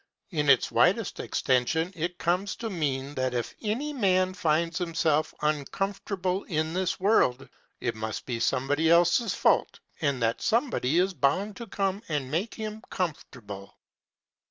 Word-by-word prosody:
In 150 -4 0
its 135 -3 +5
widest - - +2
extension 160 +8 +1
it 175 +2 -3
comes 180 +3 0
to 225 -2 -5
mean 140 -5 -2
that 130 -2 -1
if 120 - -2
any 245 +8 -2
man 185 -6 +2
finds 165 +1 0
himself 160 -3 +1
uncomfortable 185 +5 -1
in 160 -1 -1
this 185 0 -1
world, 185 - +3 0.3
it 120 - -1
must 110 0 -5
be 120 -3 -3
somebody 140 +6 +1
else's 175 +6 +4
fault, - - +2 0.2
and 140 -4 +1
that 115 0 0
somebody 225 - +1
is 190 +2 +3
bound 185 +8 +1
to 235 - -7
come 195 0 -1
and 140 -4 -2
make 185 +9 -1
him 215 -1 -5
comfortable. 115 - -5
165 Hz, 145 wpm, -27 LUFS, 140-195 Hz, 0.3 s, its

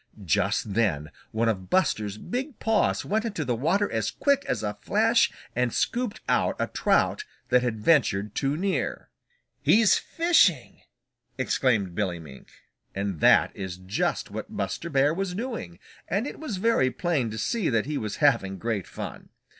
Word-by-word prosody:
Just 95 +5 0
then 85 -10 0 0.2
one 115 +1 0
of 95 -5 -2
Buster's 105 - +1
big 250 - -4
paws 225 -1 +1
went 220 +2 0
into 200 -10 -3
the 125 - 0
water 170 - +1
as 110 -2 -1
quick 280 -1 +1
as - - -1
a 105 -1 -1
flash - - +3 0.2
and 125 0 +1
scooped 240 - -1
out - - +2
a - - 0
trout 425 - +1 0.3
that 125 0 +4
had 120 -3 -1
ventured 105 -7 +2
too 140 +1 -1
near. 190 +2 -2 0.5
"He's 215 -1 +5
fishing!" 335 +1 +2 0.6
exclaimed 105 -9 +1
Billy 90 -2 -1
Mink. 75 -5 -12 0.5
And 100 -4 -3
that - - +5
is 95 -3 -5
just 95 +2 -2
what - - -7
Buster 170 - -3
Bear 145 0 +3
was 185 0 -3
doing, 215 - -5 0.3
and 200 +6 0
it - - -7
was 290 -11 -4
very 225 - +2
plain 135 -2 -1
to 110 - -6
see 220 - 0
that 115 -3 +1
he 150 0 -2
was 105 -2 -4
having 115 -10 +2
great 105 -3 -3
fun. - - -8
125 Hz, 160 wpm, -26 LUFS, -, 0.6 s, He's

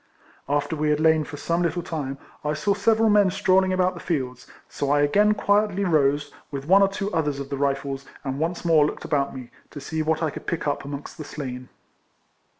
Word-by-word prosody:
After 145 +2 0
we 150 0 0
had 150 0 +2
lain 160 -1 +3
for 145 - -8
some 170 +4 -1
little 175 0 -1
time, 140 -5 -4 0.3
I 150 0 0
saw 155 +7 +1
several 220 +3 +3
men 205 -2 +5
strolling 190 0 +2
about 185 0 +2
the - - -9
fields, 130 -7 -3 0.2
so 140 - -3
I 145 0 +3
again 205 +8 +4
quietly 205 -1 +1
rose, 145 -3 +2 0.2
with 140 -2 -5
one 190 +5 +6
or 195 - +6
two 200 +1 -4
others 150 -3 0
of 140 0 -7
the 140 - -2
Rifles, 140 0 -1 0.2
and 135 -1 -3
once 170 +2 -2
more 160 -3 +5
looked 150 - -3
about 140 -3 0
me, 125 -2 -9 0.2
to 145 - -8
see 155 +3 -3
what 160 +1 0
I 155 - 0
could - - -9
pick 170 - -2
up 145 - -1
amongst 140 +3 -7
the - - -4
slain. 130 -4 -7
155 Hz, 215 wpm, -24 LUFS, 140-185 Hz, 0.3 s, one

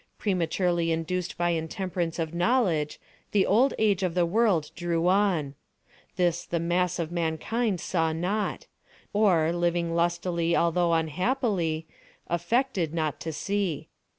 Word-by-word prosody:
Prematurely 175 -3 0
induced 165 +2 -2
by 175 0 +1
intemperance 170 +1 -2
of 165 -1 -3
knowledge 175 - +1 0.3
the 200 -2 +4
old 245 +7 +3
age 205 -3 +2
of 180 -2 -1
the 175 -1 +3
world 175 -5 +2
drew 170 -1 0
on. 185 -7 +2 0.6
This 175 -2 +1
the 170 - -2
mass 175 +1 0
of 165 -2 -3
mankind 175 +6 -1
saw 165 -2 0
not, 185 +6 -2 0.5
or, 175 -6 +3
living 175 -1 0
lustily 170 0 0
although 170 0 +2
unhappily, 165 - 0 0.4
affected 175 - 0
not 155 -3 -1
to 160 - -4
see. 190 0 -2
175 Hz, 125 wpm, -27 LUFS, 165-190 Hz, 0.6 s, the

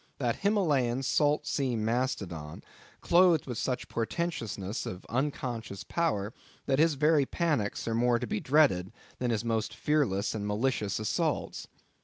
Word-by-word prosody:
That 120 -4 0
Himmalehan, 145 - +2
salt 145 +2 +2
sea 135 -5 0
Mastodon, 110 - -2 0.4
clothed 170 -3 +4
with 125 -4 -4
such 125 -2 -2
portentousness 115 - -3
of 90 - -7
unconscious 120 -5 -3
power, 115 -11 -1 0.3
that 135 - +1
his 160 -1 +4
very 150 -1 +3
panics 150 - -1
are 115 - 0
more 120 +1 +3
to - - -3
be 215 - -2
dreaded 135 - +3 0.3
than 125 - 0
his 115 -1 -1
most 110 -2 -1
fearless 120 -10 +1
and 105 -2 -3
malicious 105 -1 0
assaults! 110 -1 -2
125 Hz, 140 wpm, -29 LUFS, 110-150 Hz, 0.4 s, clothed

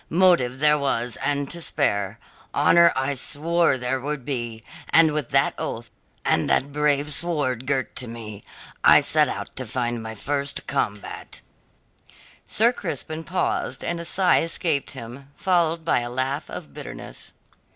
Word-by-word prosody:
Motive 170 -8 +4
there 150 +1 +4
was 120 -4 0
and 145 -1 -1
to 170 - -4
spare; 100 - 0 0.4
honour 170 0 +6
I 135 +2 0
swore 155 +3 +1
there 125 +1 -2
should 145 -2 -4
be; 120 -5 -4 0.3
and 160 -2 +5
with 150 -5 -2
that 135 0 +3
oath, 115 +1 -5 0.3
and - - +2
that 140 +2 +2
brave 150 0 +1
sword 145 -7 -1
girt 135 -2 -1
to 125 - -2
me, 110 -3 -8 0.4
I - - +8
set - - +3
out - - -6
to 120 -1 -2
my 110 0 -6
first 140 +5 -2
combat." 100 0 -3 1.1
Sir 235 +3 +3
Crispin 160 -8 -4
paused 185 +2 -1
and 170 0 -2
a 170 - -5
sigh 185 +1 +3
escaped 165 -3 0
him, 125 +4 -9
followed 170 -3 +1
by 165 - +3
a 120 0 -4
laugh 130 +4 -2
of 75 -2 -8
bitterness. - - -9
140 Hz, 150 wpm, -24 LUFS, 120-160 Hz, 1.1 s, I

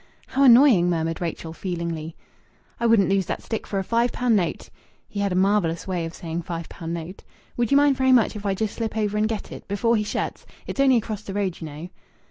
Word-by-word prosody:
"How 275 - 0
annoying!" 235 -8 +7
murmured 165 -1 -1
Rachel 165 -1 -4
feelingly. 165 -3 -4 0.6
"I 235 - +2
wouldn't 225 -4 +4
lose 195 -2 +1
that - - -4
stick 225 - -4
for 200 - -3
a 195 - 0
five 235 +4 +1
pound 245 -2 +1
note." 180 -4 -1 0.4
(He 205 - -6
had 200 -1 0
a - - 0
marvellous 185 -3 +1
way 180 -3 -2
of 165 - -7
saying 165 0 -4
"five 170 -1 -5
pound 165 0 -5
note.") 170 +3 -8 0.3
"Would 240 -2 0
you 280 - +5
mind 285 -2 +4
very 260 0 +3
much 240 -4 +4
if 205 - -7
I 195 -2 0
just 215 +1 -2
slip 225 -1 -4
over 210 -1 0
and 215 +1 +1
get 220 -2 -4
it, - - -10
before 230 +4 +1
he 210 - +1
shuts? 210 - -3 0.2
It's - - -6
only 265 -2 +5
across 215 -2 -3
the 195 -2 -7
road, 195 -4 -2
you 160 - -5
know." 150 +3 -8
200 Hz, 235 wpm, -24 LUFS, 170-230 Hz, 0.6 s, annoying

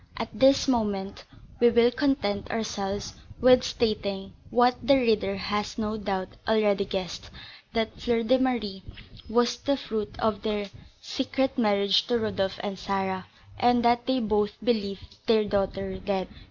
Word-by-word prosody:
At - - -3
this 270 +1 +4
moment, 205 -6 -1 0.3
we 240 - +6
will 235 +1 +4
content 250 -7 0
ourselves 205 -3 -3 0.3
with 255 0 +6
stating, 200 -4 -2 0.2
what 245 +1 +4
the 280 - +5
reader 220 -6 +2
has 205 +1 -3
no 215 -1 -2
doubt 195 -3 -3 0.2
already 210 -2 +2
guessed, 190 -3 -5 0.4
that 225 -1 -2
Fleur 235 -1 +1
de 260 +3 +3
Marie 225 -7 -1 0.5
was 240 +1 +2
the 280 0 0
fruit 220 -5 -4
of 220 -2 0
the 205 -2 -3 0.3
secret 265 0 -1
marriage 200 -3 +2
of 240 -1 +2
Rodolph 195 -3 -2
and 200 -2 -4
Sarah, 190 -1 -2 0.3
and 245 0 +3
that 240 +1 +3
they 260 0 +2
both 210 -2 +1
believed 205 -5 -2
their 220 -2 +4
daughter 195 -1 -2
dead. 190 -2 -2
215 Hz, 145 wpm, -27 LUFS, 200-240 Hz, 0.5 s, we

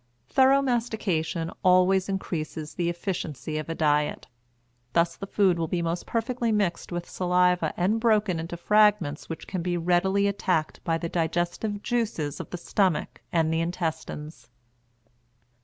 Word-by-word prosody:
Thorough 270 +1 +5
mastication 205 -10 -1
always 185 +1 +4
increases 160 -5 -4
the 170 -1 -1
efficiency 160 - -3
of 155 - -6
a 165 - -2
diet. 150 -2 +1 0.7
Thus 170 0 +2
the 195 - -7
food 190 -4 +2
will 165 - 0
be 170 +1 -1
most 170 +1 -2
perfectly 235 0 -1
mixed 195 -6 0
with 175 0 -4
saliva 180 0 +2
and 195 +6 +2
broken 210 -6 +2
into 165 +2 -5
fragments 210 -6 +3
which 165 - -6
can 185 -3 -3
be 175 0 -1
readily 180 +4 +2
attacked 185 -5 -1
by 165 -1 +1
the 170 - -3
digestive 175 +5 -1
juices 210 -12 -1
of - - -7
the 180 - -5
stomach 185 -1 0
and 160 -1 +2
the 165 - +1
intestines. 160 -6 -4
175 Hz, 145 wpm, -26 LUFS, 165-200 Hz, 0.7 s, Thorough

